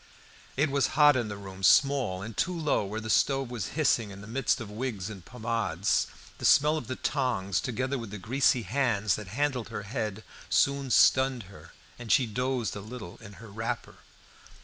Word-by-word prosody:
It 145 +1 +2
was 140 -1 +2
hot 145 -2 +7
in 120 -3 0
the 105 -1 -6
room, 95 -1 -10
small, 125 -4 +3
and 110 0 -7
too 180 -1 -1
low 150 -8 +1
where 105 +3 -4
the 110 - -7
stove 135 0 +2
was 115 -7 -3
hissing 120 -8 +2
in 100 0 -10
the - - -10
midst 120 +3 0
of 110 -3 -7
wigs 110 -3 -4
and 95 -4 -10
pomades. 110 -6 -1 0.3
The - - -4
smell 150 +2 +5
of 150 -8 -4
the 130 - -3
tongs, 125 - -1
together 130 +2 -2
with 115 -3 -7
the 105 - -6
greasy 125 +4 +2
hands 105 -2 +1
that 105 -1 -4
handled 130 +2 -1
her - - -5
head, 110 -1 -4 0.3
soon 140 -1 +2
stunned 130 -1 +4
her, - - -14 0.3
and 120 -3 -5
she 130 - +5
dozed 125 -1 -2
a - - -5
little 110 -4 -9
in 100 - -12
her 115 +2 -12
wrapper. 115 +3 -4
115 Hz, 195 wpm, -28 LUFS, 105-135 Hz, 0.3 s, hot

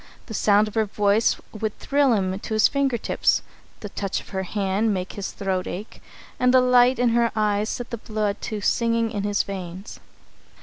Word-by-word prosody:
The 225 - -8
sound 210 0 +3
of 215 - -8
her 220 -1 +2
voice 205 +2 +2 0.2
would 215 -1 -4
thrill 280 -3 +2
him 190 -2 0
to 220 - -4
his 215 - +5
finger 275 -3 0
tips, - - +1 0.4
the 205 - -6
touch 195 -1 -3
of - - -14
her 190 -1 -3
hand 200 +2 0
make 185 0 -4
his 200 -1 -5
throat 190 -2 -2
ache, 205 +5 -7 0.4
and 250 0 +4
the 260 - +6
light 250 0 +4
in 245 0 +3
her 235 0 +2
eyes 210 0 +1
set 245 - -5
the 235 - -3
blood 215 -2 -3
to 215 -2 -4
singing 230 +1 +1
in 205 - -3
his 205 0 0
veins. 190 0 -7
215 Hz, 200 wpm, -23 LUFS, 200-235 Hz, 0.4 s, the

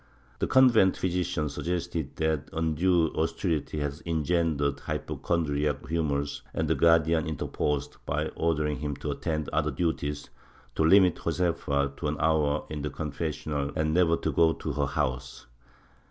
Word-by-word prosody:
The - - 0
convent 120 -8 +5
physician 90 -4 -1
suggested 85 0 -3
that 80 -2 -1
undue 80 +1 +2
austerity 80 -1 -1
had 75 +2 -3
engendered 80 -3 0
hypochondriac 75 -3 -2
humors, 75 -3 -1
and 80 - 0
the 80 - +2
Guar 80 +2 +5
dian 80 0 0
interposed 75 -1 -2
by 75 +2 -1
ordering 75 -2 -1
him 75 -1 -3
to - - -4
attend 75 -1 -2
to - - -6
other - - +2
duties, 75 -4 -2 0.4
to - - +1
limit 90 +1 +5
Josefa 80 -5 0
to 75 - -3
an 75 0 -2
hour 75 -2 +2
in 75 -1 -4
the 75 - -2
confessional, 75 -1 -3
and 80 0 0
never 85 -1 +3
to - - -2
go 80 -1 +4
to 80 - -5
her 70 0 0
house. 70 -4 -3
80 Hz, 150 wpm, -28 LUFS, 75-85 Hz, 0.4 s, convent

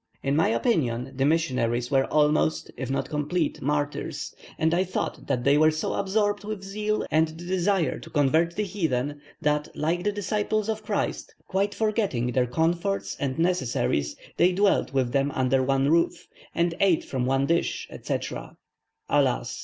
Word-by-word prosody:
In 140 +1 +1
my 160 - +3
opinion 125 - 0
the 135 +1 +1
missionaries 125 -6 0
were 135 -1 +3
almost, 150 +1 +1
if 130 0 -5
not 135 - -1
complete 150 +2 -1
martyrs, 145 +1 -2 0.2
and 160 +1 +2
I 180 +2 +3
thought 185 - -4
that 120 - 0
they 140 +3 +4
were 155 0 +6
so 155 0 -2
absorbed 205 +1 0
with 210 -2 -5
zeal 210 +2 -2
and 160 +1 +4
the 160 +2 -10
desire 185 -1 +1
to - - -11
convert 160 +4 +2
the 210 - 0
heathen, 145 -8 -2 0.2
that, 150 0 +1
like 170 +3 0
the 210 - +1
disciples 210 +1 -1
of 220 -1 -2
Christ, - - -2
quite 200 +2 0
forgetting 205 - 0
their 125 -1 +1
comforts 170 +8 0
and 135 -1 -2
necessaries, 165 - 0 0.2
they 180 +2 +4
dwelt 200 -6 +2
with 130 -3 0
them 140 +1 +2
under 130 0 +2
one 135 +1 +2
roof, 170 +3 +1 0.3
and 170 0 +1
ate 190 -4 +3
from 125 -2 -2
one 135 +1 +2
dish, 170 +3 0
etc. - - -5 0.5
Alas! - - +1
155 Hz, 165 wpm, -26 LUFS, 135-190 Hz, 0.5 s, were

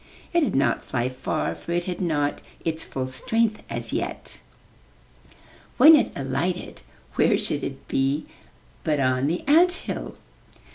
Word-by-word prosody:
It 340 - +5
did 300 - +1
not 135 - +2
fly 125 0 -1
far, 130 +1 -2
for 170 - -6
it 175 0 0
had 180 -1 -4
not 145 -5 0 0.2
its 160 -1 -1
full 130 -1 -4
strength 215 - 0
as - - -4
yet. - - -3 1.4
When 305 +5 +10
it 295 - +2
alighted, 140 +7 -2 0.3
where - - +3
should - - -2
it - - -6
be 135 +3 0 0.6
but 150 -2 +1
on 130 0 +2
the 170 +4 -1
ant 340 +5 +6
hill! 365 - -6
160 Hz, 145 wpm, -25 LUFS, 135-220 Hz, 1.4 s, When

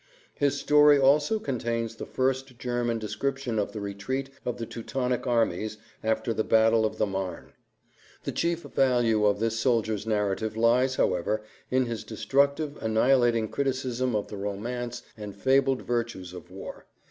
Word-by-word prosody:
His 140 0 0
story 150 0 +6
also 145 +9 +4
contains 115 - -2
the - - -7
first 130 -1 -1
German 120 -1 -1
description 115 +3 -2
of 100 - -1
the 110 - -6
retreat 115 +7 -4 0.2
of 125 - -1
the 115 - -4
Teutonic 125 +2 -3
armies 110 -3 0 0.3
after 110 +1 0
the 110 - 0
battle 110 0 +4
of - - -8
the - - +2
Marne. 95 -2 -5 0.7
The - - -3
chief 170 0 -1
value 120 -5 +2
of 100 - +2
this 115 0 0
soldier's 110 -3 +1
narrative 105 0 -1
lies, 125 +3 +3
however, 105 +3 0 0.3
in 130 0 +2
his 115 -2 -4
destructive, 140 +5 0
annihilating 115 0 +3
criticism 130 -3 -1
of 105 - -1
the 105 - -6
romance 120 +5 -4
and 105 -2 -8
fabled 135 +4 +2
virtues 115 -7 -3
of 90 -1 -10
war. 95 +1 -9
115 Hz, 150 wpm, -27 LUFS, 110-130 Hz, 0.7 s, story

